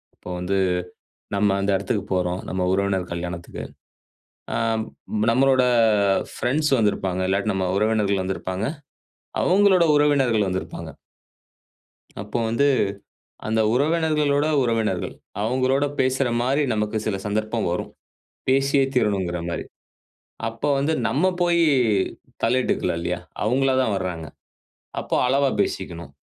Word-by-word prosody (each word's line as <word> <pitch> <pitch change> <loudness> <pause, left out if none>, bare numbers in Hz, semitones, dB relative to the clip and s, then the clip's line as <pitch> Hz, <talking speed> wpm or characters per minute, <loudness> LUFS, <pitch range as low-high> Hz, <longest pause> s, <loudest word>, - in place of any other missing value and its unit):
அப்ப - - -16
வந்து 95 +2 -1 0.8
நம்ம 100 0 +3
அந்த 100 +1 0
எடத்துக்கு 105 -2 -2
போறோம், 90 0 0
நம்ம 95 0 -1
உறவினர் 95 -2 0
கல்யாணத்துக்கு. 85 0 -6 0.9
அம், 115 -1 0 0.5
நம்மளோட 130 +1 +4 0.7
ஃப்ரெண்ட்ஸ் 145 +4 0
வந்திருப்பாங்க. 95 -4 0
இல்லாட்டி 100 +2 +1
நம்ம 95 -1 0
உறவினர்கள் 105 -3 +1
வந்திருப்பாங்க. 95 0 -3 0.8
அவுங்களோட 190 -1 +4
உறவினர்கள் 135 -8 +3
வந்திருப்பாங்க. 95 0 -5 1.3
அப்ப 105 - -14
வந்து 140 +6 +2 0.8
அந்த 110 0 +1
உறவினர்களோட 150 0 +2 0.2
உறவினர்கள். 110 -6 -1 0.3
அவுங்களோட 130 +4 +1 0.2
பேசுறமாரி 130 +1 +1
நமக்கு 105 +1 -1
சில 100 -3 0
சந்தர்ப்பம் 110 0 -1
வரும். 90 - -3 0.6
பேசியே 135 +1 +3
தீரணுங்குறமாரி. 90 -7 -1 0.8
அப்போ 115 +6 -3
வந்து 145 +4 +1 0.2
நம்ம 150 +7 0 0.2
போயி 170 -1 +3 0.8
தலையிட்டுக்கலாம் 90 -9 +1
இல்லயா! 90 +1 -2 0.2
அவுங்களா 130 +3 +2
தான் 110 -5 0
வராங்க. 85 -4 -4 0.7
அப்போ - - -2
அளவா 135 +1 +3
பேசிக்கணும். 85 -4 -4
110 Hz, 105 wpm, -23 LUFS, 95-135 Hz, 1.3 s, நம்மளோட